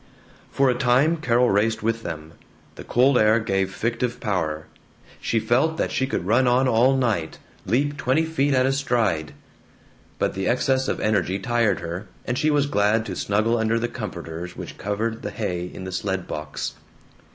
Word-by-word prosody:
For 135 - +2
a 125 - +4
time 135 +6 +3
Carol 125 -4 +2
raced 110 +3 +1
with 115 +1 0
them. 80 -4 -7 0.4
The - - -10
cold 125 +2 +3
air 110 +1 +4
gave 95 -3 -1
fictive 115 +4 -2
power. 80 -8 -2 0.6
She 115 - +1
felt 135 +9 +1
that - - -1
she 130 - 0
could 90 - -2
run 120 +6 +3
on 125 +2 +3
all 130 +3 +4
night, 110 -11 -1 0.3
leap 145 +7 +1
twenty 140 +4 +1
feet 145 -3 +1
at 130 0 +3
a 135 - +2
stride. 115 - 0 0.8
But - - 0
the 95 - -2
excess 130 +2 +1
of - - -1
energy 100 -3 +1
tired 115 -2 +1
her, 90 +4 -5 0.2
and 120 - -1
she 155 - +1
was 145 -2 +3
glad 110 -3 +2
to - - -5
snuggle 110 +3 +1
under 110 +1 +1
the 120 +1 0
comforters 90 -7 -7
which - - -8
covered 110 +3 -2
the 105 - -4
hay 90 -3 -3
in - - -8
the 95 - -6
sled 95 0 -2
box. 75 -1 -5
115 Hz, 180 wpm, -23 LUFS, 95-130 Hz, 0.8 s, a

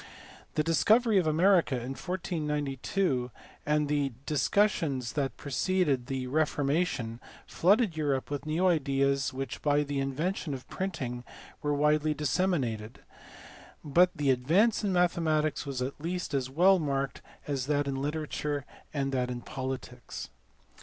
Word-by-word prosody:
The 155 - +2
discovery 215 +7 +4
of 170 - 0
America 170 -1 +4
in 125 +1 -4
1492 150 -4 -2 0.4
and 150 0 +2
the 145 -2 0
discussions 150 - +1
that 140 -2 -2
preceded 145 -3 0
the 135 -2 -2
Reformation 140 -4 0 0.3
flooded 200 0 +3
Europe 145 -3 -1
with 145 +1 -4
new 160 +4 +1
ideas 140 -4 +2
which 135 -2 -5
by 145 0 +3
the 145 -1 -2
invention 145 +3 -2
of 130 - -10
printing 130 -11 -4 0.4
were 145 -1 0
widely 150 +1 +2
disseminated; 135 - -1 0.8
but 175 +5 +4
the 140 -2 +2
advance 170 - +3
in 200 - +1
mathematics 160 -4 +1
was 130 -2 -2
at 135 +3 -5
least 180 -1 -3
as 130 -2 0
well 180 +7 +5
marked 140 -3 -2 0.2
as 135 -3 -2
that 145 -1 +1
in 135 -1 -2
literature 150 -1 -2 0.3
and 135 -2 -1
that 125 -2 0
in 120 -1 -4
politics. 130 -2 -6
145 Hz, 135 wpm, -29 LUFS, 135-165 Hz, 0.8 s, well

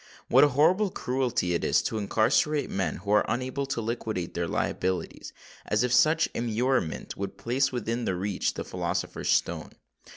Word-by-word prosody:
What 130 +3 +6
a - - +7
horrible 165 +9 +3
cruelty 125 - -1
it 85 - -1
is - - +2
to 110 - -2
incarcerate 115 +8 +1
men 95 -6 -1
who 100 - -5
are 105 - +5
unable 130 +2 -2
to 130 -4 -2
liquidate 110 -5 -3
their 85 -1 -2
liabilities—as 95 +7 -3
if 125 -1 0
such 155 +4 +4
immurement 120 -5 -1
would 100 0 -5
place 130 +3 0
within 120 -1 -2
their 95 - 0
reach 95 +2 -1
the - - -4
philosopher's - - -3
stone. - - 0
120 Hz, 160 wpm, -27 LUFS, 100-135 Hz, -, a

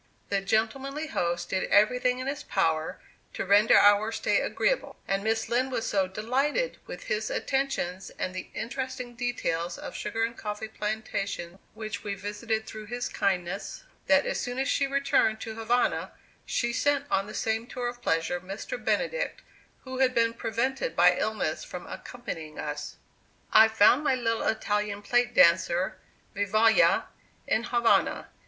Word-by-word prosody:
The 200 -1 +1
gentlemanly 270 +9 -1
host 170 -5 -1
did 190 - 0
everything 250 +4 +3
in 255 - -4
his 275 +1 -3
power 160 -1 0 0.4
to - - -2
render 205 +3 +6
our 205 +2 +5
stay - - +1
agreeable; - - 0
and 195 0 0
Miss 225 0 0
Lind 255 +2 0
was 230 - -2
so 195 -2 +1
delighted 260 - -1
with - - -7
his 215 0 -2
attentions 265 -9 -2
and 185 - -3
the 185 - -6
interesting 255 +1 -4
details 180 -8 -2
of - - -7
sugar 225 0 -2
and 230 +1 -1
coffee 210 0 -5
plantations 200 -4 -4 0.2
which 215 -2 -5
we 200 -1 -3
visited 215 +3 -3
through 215 -1 -8
his 245 +2 -3
kindness, 195 - -2 0.2
that - - +5
as - - -1
soon 245 0 -4
as 270 +1 0
she 275 -1 +1
returned 275 -5 +2
to 220 - -5
Havana, 225 +2 0 0.3
she 235 -1 0
sent 285 +2 +1
on 195 +1 +1
the 215 - -8
same 225 +1 -1
tour 250 -1 -3
of 240 0 -6
pleasure 165 -2 0
Mr. 195 - -6
Benedict, - - -1 0.4
who 260 -1 -6
had 255 -1 +3
been 230 0 +3
prevented 235 0 -2
by 180 +1 +6
illness 215 -8 -1
from 180 - -8
accompanying 165 -11 -7
us. 150 0 -5 0.6
I 220 +1 +9
found 220 +6 +5
my 270 - +3
little 230 -2 -1
Italian 210 -1 -1
plate 245 +2 +1
dancer, 170 +1 +4 0.4
Vivalla, 215 +3 +4 0.4
in 225 +2 +1
Havana. 240 -1 +2
220 Hz, 155 wpm, -28 LUFS, 200-245 Hz, 0.6 s, I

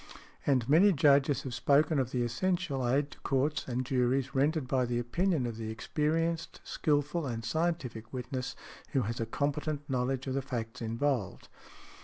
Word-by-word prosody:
And 130 -5 +3
many 170 +8 +6
Judges 140 -1 +4
have 130 - -5
spoken 145 +3 +3
of 130 -2 0
the 125 -1 0
essential 135 +1 0
aid 140 +3 +1
to - - -13
courts 140 +3 0
and 125 0 -2
juries 130 +1 +1
rendered 145 +1 +1
by 130 -1 +2
the 120 0 -1
opinion 155 +5 0
of 115 -2 -4
the 110 -1 -4
experienced, 160 +8 -1
skilful 150 +1 0
and 115 -2 -4
scientific 125 -6 -2
witness 130 0 -4 0.4
who 135 -3 +2
has 115 +3 -3
a 115 - -1
competent 145 +3 -2
knowledge 130 -1 -1
of 130 - -2
the 135 - 0
facts 120 -3 -5
involved. 115 -1 -1
135 Hz, 165 wpm, -31 LUFS, 120-150 Hz, 0.4 s, many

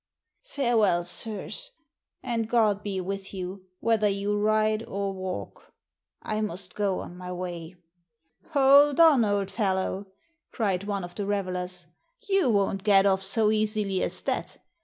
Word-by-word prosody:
Farewell, 225 - +2
sirs, 220 - -3 0.5
and 230 -2 -2
God 215 -4 +2
be 200 -2 -3
with 195 +1 -5
you 185 0 -6
whether 225 -2 +2
you 200 +1 -1
ride 215 +1 +2
or 200 0 -3
walk. 185 -1 -7 0.5
I 215 0 -2
must 195 -3 -3
go 200 -3 -1
on 175 - -9
my 180 0 -7
way." 175 -1 -6 0.4
" 160 +1 -37
Hold 280 +1 +6
on, 310 -7 +7
old 200 -2 0
fellow," 195 -1 -1 0.4
cried 200 -5 -1
one 200 -2 -2
of 175 0 -8
the 200 +1 -4
revelers. 185 -3 -3 0.4
You 390 -8 +3
won't 200 -2 +1
get 200 -2 +5
off 190 -1 +3
so 210 +2 +3
easily 215 -3 0
as - - 0
that. - - -3
200 Hz, 145 wpm, -26 LUFS, 190-215 Hz, 0.5 s, on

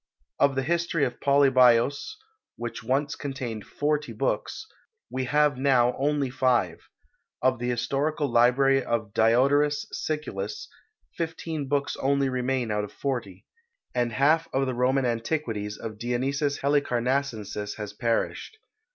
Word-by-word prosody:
Of 140 -1 +3
the 135 - 0
history 170 0 +1
of 120 - -5
Polybios, 135 - +4 0.4
which 120 -1 -6
once 140 +4 0
contained 125 -6 -5
forty 150 0 -1
books, - - -2 0.5
we 130 0 -2
have 145 0 +2
now 125 -3 +3
only 140 -1 0
five; 125 - 0 0.5
of 130 -1 +2
the 120 +1 -2
historical 140 +5 -1
library 130 +3 +4
of 115 -4 -2
Diodorus 140 +6 +3
Siculus 110 -10 -4 0.5
fifteen 160 -3 -4
books 140 +1 0
only 140 0 +1
remain 125 -2 -1
out 105 0 0
of 105 - -7
forty; 115 -9 -4 0.5
and 120 -1 0
half 155 +7 +3
of 135 +1 +1
the 130 - -2
Roman 130 +2 +1
antiquities 115 -3 -2
of 110 -2 -7
Dionysius 135 +5 -1
Helicarnassensis 125 -6 -1
has 105 -2 -6
perished. 115 - -2
130 Hz, 125 wpm, -26 LUFS, 120-145 Hz, 0.5 s, Polybios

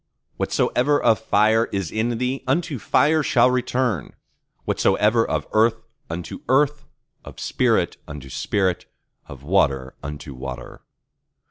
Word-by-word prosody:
Whatsoever 145 +4 +1
of 110 - +3
fire 110 +1 +3
is 95 -7 -4
in 115 +2 -1
thee, 125 +2 -2
unto 140 -1 0
fire 150 +10 +3
shall 125 -3 +3
return; 125 - -1 0.5
whatsoever 110 +2 +2
of - - -2
earth, 110 +1 +2 0.3
unto 85 +1 -6
earth; 145 +2 +2 0.4
of - - -12
spirit, - - +1
unto 70 -2 -8
spirit; 95 +3 -1 0.4
of 70 -1 -11
water, 70 -6 +1
unto 70 0 -7
water. 65 -1 -8
110 Hz, 120 wpm, -22 LUFS, 80-125 Hz, 0.5 s, of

